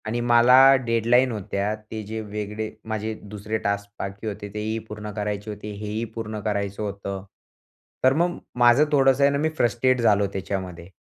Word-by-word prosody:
आणि 115 Hz, +2 st, -1 dB
मला 120 Hz, +1 st, +6 dB, 0.3 s
डेडलाईन 120 Hz, +2 st, +3 dB
होत्या. 105 Hz, -1 st, -2 dB
ते 110 Hz, 0 st, -8 dB
जे 110 Hz, +2 st, -5 dB
वेगळे 105 Hz, +1 st, -4 dB, 0.2 s
माझे 110 Hz, 0 st, -2 dB
दुसरे 105 Hz, +1 st, -4 dB
टास्क 100 Hz, 0 st, -1 dB
बाकी 100 Hz, +3 st, -5 dB
होते, 105 Hz, -1 st, -5 dB
तेही 110 Hz, +1 st, -2 dB
पूर्ण 105 Hz, 0 st, -7 dB
करायचे 105 Hz, 0 st, -3 dB
होते, 105 Hz, 0 st, -7 dB
हे 105 Hz, +1 st, -7 dB
ही 110 Hz, +2 st, -2 dB
पूर्ण 110 Hz, -2 st, -4 dB
करायचं 100 Hz, -1 st, -2 dB
होतं. 100 Hz, -1 st, -5 dB, 0.8 s
तर 130 Hz, +1 st, +6 dB
मग 175 Hz, +3 st, +1 dB, 0.2 s
माझं 120 Hz, +5 st, +6 dB
थोडंसं 135 Hz, -1 st, +4 dB
आहे 140 Hz, -, +5 dB
ना, 140 Hz, -, 0 dB
मी 155 Hz, +2 st, +1 dB
फ्रस्ट्रेट 125 Hz, +1 st, +2 dB
झालो 105 Hz, -3 st, +3 dB
त्याच्यामध्ये 95 Hz, -3 st, -5 dB
110 Hz, 170 wpm, -24 LUFS, 100-120 Hz, 0.8 s, मला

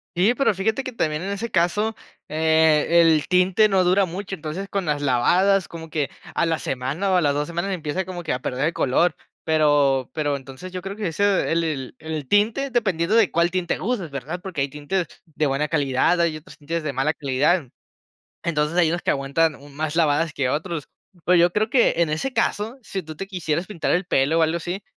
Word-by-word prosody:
Sí, 195 Hz, +7 st, +3 dB
pero 260 Hz, -4 st, +2 dB
fíjate 220 Hz, +7 st, -1 dB
que 255 Hz, -, -5 dB
también 155 Hz, -8 st, -1 dB
en 195 Hz, -, -4 dB
ese 220 Hz, +4 st, -4 dB
caso, 205 Hz, +6 st, +1 dB, 0.3 s
eh, 160 Hz, 0 st, +3 dB
el 160 Hz, -3 st, +3 dB
tinte 185 Hz, +4 st, +4 dB
no 190 Hz, -1 st, +3 dB
dura 185 Hz, +2 st, +3 dB
mucho. 190 Hz, +3 st, -6 dB
Entonces 165 Hz, +4 st, -5 dB
con 195 Hz, -3 st, -2 dB
las 145 Hz, -1 st, -1 dB
lavadas 180 Hz, +10 st, +3 dB
como 165 Hz, -1 st, -9 dB
que 150 Hz, -3 st, -1 dB, 0.2 s
a 170 Hz, -, +1 dB
la 165 Hz, -1 st, +1 dB
semana 140 Hz, +11 st, -2 dB
o -, -, +3 dB
a 180 Hz, -, +4 dB
las 145 Hz, -2 st, +2 dB
2 150 Hz, 0 st, -1 dB
semanas 175 Hz, +3 st, -3 dB
empieza 170 Hz, +1 st, -3 dB
como 180 Hz, -2 st, -6 dB
que 155 Hz, -, -1 dB
a 125 Hz, -, -2 dB
perder 130 Hz, +3 st, -2 dB
el 165 Hz, -, 0 dB
color, 155 Hz, +6 st, +2 dB, 0.3 s
pero 145 Hz, -4 st, +2 dB
pero 145 Hz, -2 st, 0 dB
entonces 135 Hz, +7 st, -9 dB
yo 185 Hz, -1 st, -5 dB
creo 195 Hz, +2 st, -6 dB
que 210 Hz, -4 st, -3 dB
ese 200 Hz, +2 st, +1 dB
el 165 Hz, 0 st, +2 dB
el 135 Hz, -6 st, -4 dB
el 155 Hz, -4 st, -5 dB
tinte 230 Hz, +7 st, +2 dB
dependiendo 200 Hz, -5 st, +1 dB
de 225 Hz, -4 st, +5 dB
cuál 170 Hz, +1 st, +2 dB
tinte 180 Hz, -2 st, -1 dB
uses, 195 Hz, -7 st, -2 dB
¿verdad?, 140 Hz, +6 st, -5 dB
porque 180 Hz, -7 st, -4 dB
hay 140 Hz, -, 0 dB
tintes 150 Hz, +5 st, -2 dB, 0.2 s
de 155 Hz, -2 st, -2 dB
buena 140 Hz, +2 st, 0 dB
calidad, 145 Hz, +3 st, +1 dB
hay 165 Hz, -2 st, +1 dB
otros 155 Hz, -, -15 dB
tintes 165 Hz, +3 st, -3 dB
de 145 Hz, -, -2 dB
mala 145 Hz, +5 st, +1 dB
calidad. 145 Hz, +3 st, +1 dB, 0.8 s
Entonces 155 Hz, 0 st, -1 dB
hay 170 Hz, -3 st, +4 dB
unos 175 Hz, +2 st, -2 dB
que -, -, +2 dB
aguantan 140 Hz, +3 st, 0 dB, 0.2 s
más 155 Hz, +1 st, -3 dB
lavadas 160 Hz, -1 st, +2 dB
que 130 Hz, -3 st, -1 dB
otros. 155 Hz, +1 st, -3 dB, 0.4 s
Pero 180 Hz, 0 st, +4 dB
yo 175 Hz, +1 st, +4 dB
creo 215 Hz, +2 st, 0 dB
que 245 Hz, -2 st, +4 dB
en 165 Hz, -3 st, +2 dB
ese 210 Hz, +13 st, -2 dB
caso, 220 Hz, +4 st, -1 dB
si 190 Hz, -3 st, -5 dB
tú 155 Hz, 0 st, -8 dB
te 195 Hz, -, -5 dB
quisieras 175 Hz, -2 st, -2 dB
pintar 175 Hz, -6 st, -2 dB
el 180 Hz, +1 st, +1 dB
pelo 155 Hz, +2 st, +2 dB
o -, -, +4 dB
algo 160 Hz, +1 st, +2 dB
así, 175 Hz, +3 st, -4 dB
165 Hz, 215 wpm, -23 LUFS, 150-190 Hz, 0.8 s, de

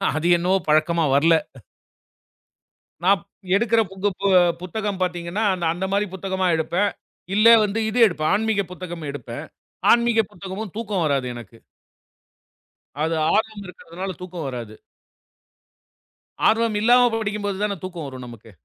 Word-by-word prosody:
அது 155 Hz, +2 st, 0 dB
என்னவோ 180 Hz, +3 st, +2 dB
பழக்கமா 155 Hz, +2 st, +2 dB
வரல. 165 Hz, +4 st, +5 dB, 1.7 s
நான் 195 Hz, +2 st, +4 dB, 0.4 s
எடுக்குற 230 Hz, +1 st, +3 dB, 0.8 s
புத்தகம் 200 Hz, +1 st, -4 dB
பாத்தீங்கன்னா, 175 Hz, +3 st, -3 dB
அந் 175 Hz, -2 st, -3 dB
அந்த 185 Hz, +2 st, -3 dB
மாதிரி 205 Hz, +1 st, +1 dB
புத்தகமா 190 Hz, 0 st, -2 dB
எடுப்பேன். 175 Hz, +5 st, 0 dB, 0.5 s
இல்ல 215 Hz, +2 st, +5 dB, 0.2 s
வந்து 210 Hz, +2 st, -2 dB
இது 245 Hz, +3 st, -1 dB
எடுப்பேன். 155 Hz, -5 st, -1 dB
ஆன்மீக 220 Hz, -1 st, +1 dB
புத்தகம் 175 Hz, -3 st, -7 dB
எடுப்பேன். 145 Hz, -, -7 dB, 0.5 s
ஆன்மீக 235 Hz, -1 st, +3 dB
புத்தகமும் 190 Hz, +2 st, -7 dB
தூக்கம் 205 Hz, -6 st, -2 dB
வராது 140 Hz, -3 st, 0 dB
எனக்கு. 115 Hz, -1 st, -12 dB, 1.4 s
அது 165 Hz, +1 st, 0 dB, 0.2 s
ஆர்வம் 215 Hz, -1 st, -1 dB
இருக்குறதுனால 180 Hz, +1 st, -7 dB
தூக்கம் 180 Hz, -3 st, -6 dB
வராது. 120 Hz, -4 st, -6 dB, 1.7 s
ஆர்வம் 225 Hz, 0 st, +2 dB
இல்லாம 245 Hz, +2 st, +5 dB
படிக்கும் 210 Hz, -1 st, -3 dB
போது 200 Hz, -2 st, -2 dB
தான் 200 Hz, -4 st, -2 dB
தூக்கம் 175 Hz, -5 st, -6 dB
வரும் 130 Hz, -2 st, -8 dB
நமக்கு. 115 Hz, -2 st, -13 dB
185 Hz, 120 wpm, -22 LUFS, 165-210 Hz, 1.7 s, வரல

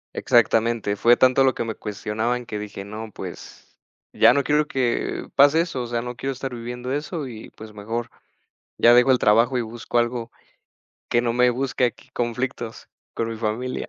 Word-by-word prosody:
Exactamente, 115 Hz, -2 st, +2 dB
fue 120 Hz, +4 st, +4 dB
tanto 130 Hz, +1 st, +4 dB
lo 130 Hz, -1 st, +3 dB
que -, -, -2 dB
me 115 Hz, -1 st, -4 dB
cuestionaban 110 Hz, +4 st, -3 dB
que 105 Hz, -2 st, -5 dB
dije: 100 Hz, -1 st, -7 dB
"No, 110 Hz, +2 st, -7 dB
pues, -, -, -10 dB, 0.4 s
ya -, -, +6 dB
no 140 Hz, +1 st, +1 dB
quiero 150 Hz, +1 st, +1 dB
que 125 Hz, -3 st, -1 dB
pase 145 Hz, +4 st, +6 dB
eso, 165 Hz, -7 st, -3 dB
o 120 Hz, -, -4 dB
sea, 120 Hz, 0 st, -2 dB
no 125 Hz, 0 st, -6 dB
quiero 135 Hz, +3 st, -3 dB
estar 130 Hz, 0 st, -6 dB
viviendo 125 Hz, +1 st, -6 dB
eso 150 Hz, +1 st, -3 dB
y 110 Hz, -3 st, -10 dB
pues 110 Hz, 0 st, -12 dB
mejor 115 Hz, +3 st, -5 dB, 0.7 s
ya 120 Hz, +1 st, +6 dB
dejo 125 Hz, +2 st, +6 dB
el 125 Hz, -, +3 dB
trabajo 115 Hz, +5 st, +3 dB
y 120 Hz, -, +1 dB
busco 115 Hz, +1 st, -4 dB
algo 120 Hz, 0 st, -1 dB, 0.8 s
que 120 Hz, -, +3 dB
no 120 Hz, -1 st, 0 dB
me 125 Hz, +1 st, +4 dB
busque 130 Hz, 0 st, 0 dB
aquí 120 Hz, -, -5 dB
conflictos 120 Hz, -1 st, -4 dB, 0.3 s
con 115 Hz, -, -1 dB
mi 115 Hz, -, -5 dB
familia". 115 Hz, +3 st, -3 dB
120 Hz, 185 wpm, -23 LUFS, 115-130 Hz, 0.8 s, ya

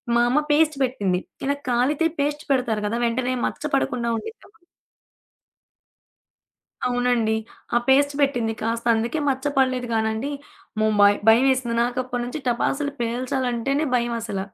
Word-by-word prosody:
మా 235 Hz, -, +4 dB
అమ్మ 265 Hz, +5 st, +3 dB
పేస్ట్ 305 Hz, 0 st, +3 dB
పెట్టింది. 200 Hz, -8 st, 0 dB, 0.3 s
ఇలా 280 Hz, +1 st, +1 dB
కాలితే 260 Hz, +6 st, +1 dB
పేస్ట్ 295 Hz, +1 st, -1 dB
పెడతారు 240 Hz, -5 st, +1 dB
గదా! 230 Hz, +3 st, -2 dB
వెంటనే 250 Hz, +2 st, 0 dB
మచ్చ -, -, -7 dB
పడకుండా 245 Hz, -3 st, -1 dB
ఉండిద్దెమొ 430 Hz, -, -10 dB
అని. 350 Hz, -, -34 dB, 2.2 s
అవునండి. 245 Hz, -3 st, +1 dB, 0.4 s
ఆ -, -, +7 dB
పేస్ట్ 285 Hz, +2 st, +4 dB
పెట్టింది. 245 Hz, -5 st, +1 dB
కాస్త, 230 Hz, +1 st, -2 dB
అందుకే 230 Hz, +7 st, -1 dB
మచ్చ 265 Hz, 0 st, -3 dB
పడలేదు 255 Hz, -2 st, +1 dB
గానండి. 220 Hz, +4 st, -1 dB, 0.5 s
ము 215 Hz, -, +3 dB
మ -, -, +7 dB, 0.3 s
భయమేసింది 250 Hz, 0 st, +4 dB
నాకు, 245 Hz, +1 st, -2 dB
అప్పటి 245 Hz, -1 st, -3 dB
నుంచి 250 Hz, +5 st, -5 dB
టపాసులు 280 Hz, +4 st, 0 dB
పేల్చాలంటేనే 250 Hz, +3 st, -1 dB
భయం 240 Hz, -1 st, -1 dB
అసల. 205 Hz, -4 st, -4 dB
245 Hz, 135 wpm, -23 LUFS, 230-275 Hz, 2.2 s, ఆ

